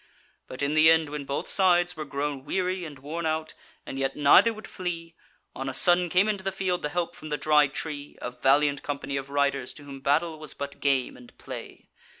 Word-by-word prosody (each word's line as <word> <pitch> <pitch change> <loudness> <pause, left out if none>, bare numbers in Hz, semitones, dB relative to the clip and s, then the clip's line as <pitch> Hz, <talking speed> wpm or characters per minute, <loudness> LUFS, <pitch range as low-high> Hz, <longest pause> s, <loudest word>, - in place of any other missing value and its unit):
But 130 +2 -6
in 140 +1 +1
the 155 +1 +6
end 160 -2 +4
when 145 -1 -5
both 140 +1 -3
sides 180 -2 +3
were 155 - -5
grown 140 -1 -3
weary 185 +3 -1
and 150 -3 -9
worn 160 +5 -4
out, 155 0 -2 0.3
and 135 - -6
yet 135 0 -1
neither 150 +10 +6
would 215 -1 -9
flee, 170 -3 -5 0.4
on 135 0 -4
a 130 - -5
sudden 175 +2 +4
came 185 +5 +3
into 205 -3 -1
the 195 - -1
field 185 -2 -1
the 150 - -2
help 175 +2 -2
from 155 - -10
the 150 - -1
Dry 150 -1 +4
Tree, 145 0 -6
a 125 - -5
valiant 140 +3 +2
company 140 -1 -4
of 135 0 -4
riders 140 -2 0
to 150 - -13
whom 140 -1 -9
battle 155 +4 +1
was 155 -2 -5
but 140 0 -6
game 135 -3 +1
and 125 - -16
play. - - -9
150 Hz, 215 wpm, -27 LUFS, 140-175 Hz, 0.4 s, the